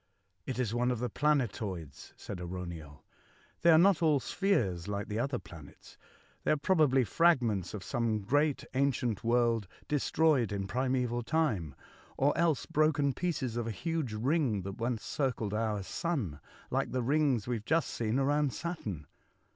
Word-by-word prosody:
" - - -46
It 130 - -3
is 120 -4 -1
one 120 +1 +1
of 125 - 0
the 120 0 -3
planetoids," 110 - -1
said 100 - -7
AraunieL 85 -5 -7 0.3
'' - - -32
They 170 - +5
are 160 - +8
not 185 0 +5
all 155 -4 +4
spheres 120 - 0
like 100 0 -3
the 105 +1 -2
other 130 +1 -1
planets. 85 -7 -13 0.5
They - - -1
are 155 - +4
probably 145 -5 +3
fragments 120 - +2
of 100 - -6
some 115 -1 -1
great 145 +7 +1
ancient 130 -5 0
world 115 -3 +2 0.2
destroyed 145 -4 +2
in 100 -1 -2
primaeval 125 +2 0
time, 115 - 0 0.4
or 140 +2 +2
else 165 -4 +1
broken 150 -2 +2
pieces 130 -10 -2
of 120 -1 -2
a - - -1
huge 160 - -2
ring 120 - +1
that 100 +1 -7
once 115 -1 -2
circled 125 -7 -2
our 105 -2 -1
sun, 115 - -3 0.3
like - - 0
the 130 -1 0
rings 135 -4 +2
we 120 -1 0
have 110 - -10
just 160 +1 +1
seen 115 +1 -1
around 140 0 +2
Saturn." 105 - -5
125 Hz, 165 wpm, -31 LUFS, 105-145 Hz, 0.5 s, are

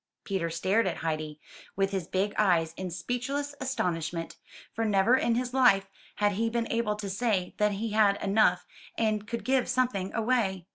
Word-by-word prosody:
'' - - -62
Peter 190 -4 -2
stared 190 +7 +1
at - - -2
Heidi, 155 -1 -3 0.4
with 195 0 +1
his 190 -4 -3
big 200 +2 -1
eyes, 170 -6 +2
in 185 -1 -5
speechless 250 - -3
astonishment; 170 -10 -2 0.4
for 225 - -2
never 210 +3 +4
in 235 -3 +1
his 250 +1 -2
life 220 -7 +4 0.3
had 205 0 +2
he 225 +3 0
been 235 0 -1
able 230 -2 0
to 210 -1 -6
say 195 -2 -1
that 210 0 +3
he 215 +3 -3
had 205 -2 +4
had - - -4
enough 195 -3 +3 0.3
and 215 -2 0
could 235 +1 -5
give 260 -1 +1
something 245 -7 0
away. 215 -6 0
210 Hz, 185 wpm, -28 LUFS, 185-235 Hz, 0.4 s, never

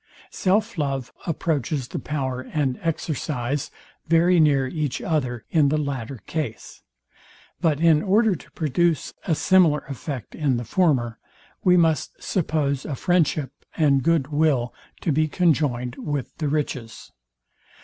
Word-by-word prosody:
Self 210 +1 0
love 135 -3 -2
approaches 150 -5 -1
the - - -4
power 130 -4 -3
and 135 -1 -2
exercise 145 -4 -2 0.4
very 170 +2 +4
near 140 -4 +4
each 150 -2 -2
other 125 -8 -2
in 150 -4 +4
the 155 - +1
latter 135 -4 -3
case; 145 -9 -5 0.8
but 155 -5 +1
in 160 -2 +5
order 215 +2 +3
to - - -14
produce 160 +1 0
a 165 - +2
similar 170 -4 +4
effect 135 -1 -6
in 140 -5 0
the 120 - -4
former, 125 - +1 0.4
we 180 -1 +5
must 165 -2 +2
suppose 145 -6 -1
a 145 - -4
friendship 160 -4 +1 0.3
and 140 -4 +4
good 160 -2 +1
will 145 -5 +1 0.3
to 165 - 0
be 155 +2 +2
conjoined 145 -7 +1
with 145 -4 -4
the 155 - 0
riches. 135 -6 -3
150 Hz, 135 wpm, -24 LUFS, 135-165 Hz, 0.8 s, in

